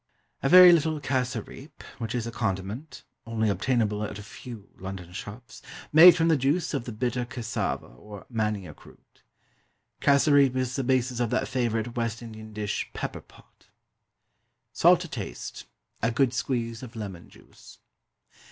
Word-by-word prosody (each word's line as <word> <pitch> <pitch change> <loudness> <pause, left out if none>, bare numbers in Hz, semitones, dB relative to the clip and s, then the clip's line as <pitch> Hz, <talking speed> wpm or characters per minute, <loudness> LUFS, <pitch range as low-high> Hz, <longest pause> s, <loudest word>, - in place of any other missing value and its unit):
A 135 - +1
very 180 0 +10
little 160 -1 +1
cassareep, 130 +1 -4 0.2
which 115 0 -4
is 120 -2 -2
a 115 - -5
condiment 110 +6 -4 0.2
(only 110 -1 0
obtainable 105 +1 0
at 105 -1 -5
a 105 - -9
few 115 -1 -10
London 95 -2 -7
shops) 105 +5 -9 0.3
made 170 +2 +10
from 165 -1 +2
the 165 - +4
juice 145 +7 0
of 135 -4 -2
the 120 - -5
bitter 120 +2 -2
cassava, 120 -3 -3
or 100 +12 -12
manioc 105 - -3
root. - - -20 0.8
Cassareep 140 -2 +4
is 130 -1 -1
the 135 - -1
basis 130 -1 0
of 120 -2 0
that - - 0
favourite 120 -2 -1
West 115 -1 -2
Indian 110 -1 -10
dish 105 -1 -3
"Pepper - - -4
pot." - - -23 1.1
Salt - - +5
to - - -5
taste. - - -7 0.4
A 115 - +2
good 125 +1 +1
squeeze 115 -3 -2
of 125 -2 -10
lemon 100 -6 -7
juice. - - -17
120 Hz, 150 wpm, -27 LUFS, 105-130 Hz, 1.1 s, very